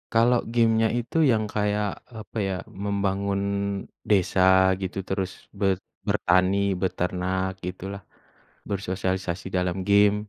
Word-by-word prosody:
Kalo 115 +2 +5 0.2
game-nya 115 -1 +4
itu 120 +6 -4
yang 110 -2 +1
kayak 105 0 +1 0.3
apa 110 - -10
ya, 95 - -1 0.3
membangun 100 0 0 0.7
desa 95 -2 +3 0.4
gitu, 95 0 -4
terus 95 -1 -1 0.3
be 100 - +1 0.4
bertani, 95 +2 +3 0.2
beternak 95 0 -1 0.2
gitulah, 95 +2 -6 0.7
bersosialisasi 95 -2 -2
dalam 90 0 0
game. 100 0 +5
100 Hz, 105 wpm, -25 LUFS, 95-105 Hz, 0.7 s, Kalo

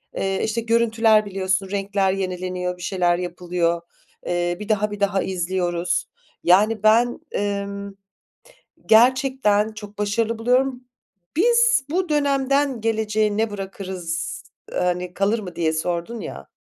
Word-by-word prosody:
Eee, 195 0 -1
işte, 225 +1 -1
görüntüler 225 -1 +3
biliyorsun 190 -1 -1
renkler 195 -1 0
yenileniyor, 180 -1 -3
bir 180 - -13
şeyler 175 -2 +1
yapılıyor. 175 -1 -1 0.4
Eee, 175 0 -1
bir 210 +1 -7
daha, 210 0 +1
bir 205 - -6
daha 195 -1 +1
izliyoruz. 175 -1 -1 0.4
Yani 210 +4 +4
ben, 235 +3 +4 0.2
ımm, 200 0 -3 0.9
gerçekten 230 -2 +4
çok 210 -1 -10
başarılı 220 +2 0
buluyorum. 250 +2 +1 0.5
"Biz 475 - +4
bu 360 +2 -1
dönemden 275 -3 +1
geleceğe 215 -1 0
ne 225 0 +1
bırakırız, 190 -4 -5 0.3
eee, - - -4
hani, 180 0 -1
kalır 200 +5 +1
mı?" 185 -4 -8
diye 160 -2 0
sordun 175 +7 -2
ya. 70 - -8
205 Hz, 125 wpm, -22 LUFS, 180-225 Hz, 0.9 s, Yani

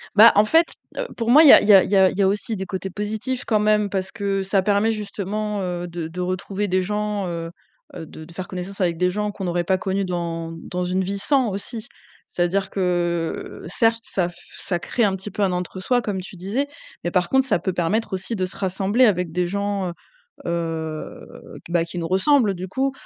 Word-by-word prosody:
Bah, 220 +3 +9
en 210 +1 +6
fait, 325 +9 +5 0.3
heu, - - -2
pour 230 -1 -1
moi, 295 +6 +8
il 300 - +8
y - - +12
a - - +9
il - - -2
y 210 - +8
a 195 - +8
il - - -5
y - - +4
a 190 -1 +6
il - - -7
y - - +2
a 195 - +4
aussi 205 +3 -1
des 190 -1 -4
côtés 190 +1 -4
positifs 220 +6 -3
quand 215 -2 +2
même 210 -1 +2
parce 190 -1 -2
que 195 -1 -1
ça 195 0 +2
permet 205 +3 +2
justement, 210 0 -3
heu, 175 -1 -3
de 170 -1 -5
de 175 +3 -6
retrouver 185 +3 -2
des 185 +1 +2
gens, 210 0 -2
heu 165 -1 -4 0.4
heu, 160 - -6
de 160 - -11
de 170 +2 -13
faire 185 +1 -6
connaissance 185 +1 -6
avec 175 -3 +1
des 180 +1 +2
gens 210 +2 -2
qu'on 200 - -7
n'aurait 175 -1 -1
pas 190 +2 +2
connus 190 +1 -1
dans 170 -2 -3
dans 180 +2 -4
une 185 +1 0
vie 200 +2 -3
sans 265 +1 +2
aussi. 215 +3 -5 0.4
C'est-à-dire 190 +2 0
que 175 -3 -2
certes, 225 +6 +2
ça 180 -5 -1
f 175 - -15 0.2
ça 175 -2 -2
crée 235 - -1
un 200 -3 +2
petit 195 +2 -8
peu 205 - -1
un 190 - +2
entre 180 +1 -4
soi 245 +5 +2
comme 200 -4 -3
tu 185 0 -11
disais. 210 +11 -2 0.4
Mais 175 - -2
par 180 -1 +2
contre, 265 0 +3
ça 220 -9 +1
peut 185 +2 -2
permettre 190 +6 0
aussi 190 +5 -3
de 185 - 0
se 185 - -8
rassembler 195 +5 +2
avec 180 -6 +1
des 180 0 0
gens, 200 0 -2
heu - - -6 0.5
heu, 165 -2 -4 0.4
q - - -11
bah, 170 -1 +2
qui 170 - -8
nous 165 - -3
ressemblent 205 - +3
du 185 0 -6
coup, 265 +8 0
190 Hz, 240 wpm, -22 LUFS, 180-210 Hz, 0.5 s, y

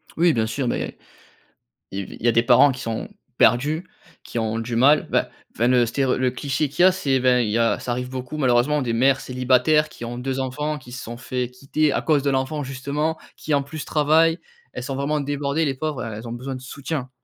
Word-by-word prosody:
Oui 170 0 +4
bien 115 -4 +1
sûr, 130 +3 -2
beh - - -2 1.0
il 95 - -4
y - - -12
a - - -9
il - - -6
y - - +4
a - - +6
des 115 +1 +3
parents 125 +4 +6
qui 125 - -7
sont 115 -1 -3 0.3
perdus, 150 +8 +3 0.4
qui 120 - -4
ont 110 0 -1
du 115 +1 -4
mal. 140 +6 +4
Bah, - - +1 0.3
enfin 120 - +2
le 125 -1 +4
stéréo 130 +3 0
le 130 -1 +1
cliché 140 +3 -1
qu'il 160 +6 +1
y - - +9
a, 190 - +7
c'est 140 -8 0
ben 125 0 +3
il 115 -3 0
y 105 - 0
a, 115 -1 +2
ça 125 - -4
arrive 125 +1 -3
beaucoup 130 +3 -6
malheureusement 135 +2 +2
des 120 -3 -1
mères 135 +3 +3
célibataires 130 +4 +2
qui - - -11
ont 120 +1 -5
2 130 +1 -3
enfants 150 +4 -2
qui 125 -2 -14
se 125 - -6
sont 115 +1 -7
fait 125 0 -3
quitter 140 +3 0
à - - 0
cause 150 -4 +2
de 140 - +1
l'enfant 135 +3 -1
justement 140 +4 -2 0.2
qui 155 - -3
en 140 -1 +2
plus 145 +2 -7
travaillent. 160 +3 +3 0.3
Elles 125 - -5
sont 135 +1 -4
vraiment 145 +3 -1
débordées 145 +2 -1
les 135 -2 -1
pauvres. 145 -3 -3
Elles 110 0 -6
ont - - -6
besoin 130 +3 -5
de 130 - -8
soutien. 135 0 -5
130 Hz, 240 wpm, -23 LUFS, 125-150 Hz, 1.0 s, y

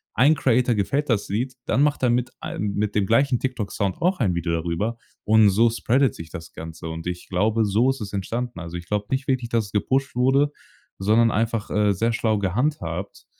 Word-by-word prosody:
Ein 140 +7 +5
Creator 125 -3 +2
gefällt 140 +8 -1
das 110 -4 +1
Lied, 120 +6 -2
dann 135 - +1
macht 145 -2 +1
er 125 - +4
mit 120 0 0
ein 100 -1 -3
mit 105 0 -1
dem 105 -2 +2
gleichen 130 +2 +3
TikTok 125 -6 -3
Sound 95 -2 -1
auch 180 +2 +1
ein 95 -8 +1
Video 85 0 -1
darüber, 85 +8 -2 0.3
und 110 -1 +5
so 115 +5 +4
spreadet 130 +3 +2
sich 85 0 -9
das 80 -1 -9
Ganze. 80 0 -8
Und 80 +1 -6
ich 90 0 -5
glaube, 110 +4 +1
so 110 +6 +2
ist 135 -2 -2
es 100 -1 -6
entstanden. 115 +3 -3
Also, 85 0 -6
ich 85 - -9
glaube 105 0 -2
nicht 130 0 -1
wirklich, 125 -3 0
dass 115 -2 +1
es - - -15
gepusht 130 +6 0
wurde, 135 +3 +3 0.5
sondern 110 +3 +3
einfach, 115 0 -1
äh, 105 -1 +2
sehr 115 +5 0
schlau 110 -2 +1
gehandhabt 100 - -2
110 Hz, 210 wpm, -23 LUFS, 95-125 Hz, 0.5 s, Ein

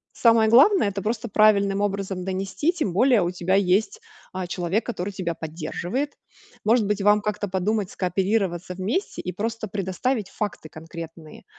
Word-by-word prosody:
самое 230 -2 +4
главное 270 - +6
это 200 0 -4
просто 230 +4 -2
правильным 200 -2 +3
образом 195 -2 -2
донести, 195 - -1
тем 300 - -2
более 235 0 +4
у 175 - -1
тебя 180 +1 0
есть, 200 - +2 0.3
а, 185 -1 -4
человек, 180 +4 -1
который 205 -4 -3
тебя 180 -3 -3
поддерживает. 175 - -4 0.5
Может 220 0 +3
быть 210 0 -1
вам 210 +1 +5
как-то 210 0 -2
подумать, 195 +2 -1
скооперироваться 185 -1 -1
вместе 210 - -2
и 180 - -3
просто 220 +4 -3
предоставить 200 +3 -2
факты 205 -6 -5
конкретные. 165 0 -10
200 Hz, 150 wpm, -24 LUFS, 180-220 Hz, 0.5 s, главное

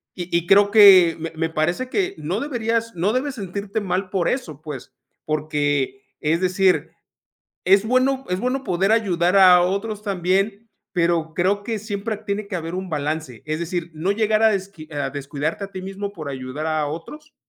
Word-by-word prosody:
y 175 -1 -1
y 170 0 -3
creo 200 +1 +6
que 190 -6 +8
me 165 0 -5
me 160 0 -1
parece 175 +11 -1
que, 380 +5 -1
no 170 +8 -3
deberías 230 -4 -1
no 190 +6 0
debes 265 +2 -1
sentirte 200 +1 -4
mal 185 0 -2
por 185 -4 0
eso, 155 - -4
pues, 150 -5 -8 0.3
porque, 145 -3 -1 0.2
es 160 +3 +1
decir, 185 0 +2 0.7
es 195 +3 +4
bueno 260 +2 +1
es 180 - -1
bueno 260 +3 -1
poder 195 0 +1
ayudar 185 -4 +2
a 180 -2 +8
otros 200 +3 -2
también, 195 +1 0 0.3
pero 170 -2 0
creo 200 +3 +1
que 225 -1 -2
siempre 215 0 -4
tiene 210 -1 -4
que 185 - -6
haber 165 +1 -5
un 190 0 -5
balance. 150 -4 -3
Es 155 +1 -2
decir, 170 0 -3
no 180 +6 0
llegar 215 +1 +1
a 220 - +6
desqui 195 -6 -5
a 145 -2 -2
descuidarte 145 +6 -4
a 195 - -7
ti 185 - -6
mismo 200 +1 -5
por 155 -7 -7
ayudar 130 +3 -5
a 155 -2 0
otros, 300 - -8
185 Hz, 180 wpm, -22 LUFS, 160-210 Hz, 0.7 s, que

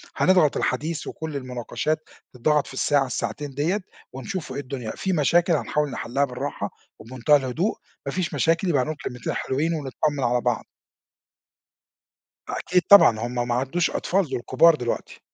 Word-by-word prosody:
هنضغط 180 -6 +4
الحديث 155 +5 -2
وكُلّ 160 -2 -6
المناقشات 130 +4 -3 0.2
تتضغط 145 +4 +1
في - - -10
الساعة 140 +1 +2
الساعتين 125 +3 -3
ديّة 170 +9 0 0.3
ونشوف 170 +7 -5
إيه - - -4
الدنيا، 130 -4 -5
في 190 - -1
مشاكل 170 +2 +3
هنحاول 150 +1 0
نِحلّها 130 +3 -1
بالراحة 135 +2 -4 0.3
وبمنتهى 130 +5 +2
الهدوء، 145 - 0 0.3
ما 140 - -2
فيش 180 +2 -2
مشاكل 165 +3 +2
يبقى 145 -6 +3
هانقول 155 +4 -3
كلمتين 125 -2 -4
حلوين 150 +6 -1
ونتطمن 145 -1 -2
على 120 0 +2
بعض. - - -1 1.8
أكيد 180 0 0
طبعًا 160 - +8
هُم 120 +1 -2
ما 120 - +1
عادُوش 135 +8 0
أطفال 190 -2 0
دُول - - -2
كُبار 165 +6 +5
دلوقتي. 120 -5 -4
145 Hz, 150 wpm, -24 LUFS, 125-165 Hz, 1.8 s, طبعًا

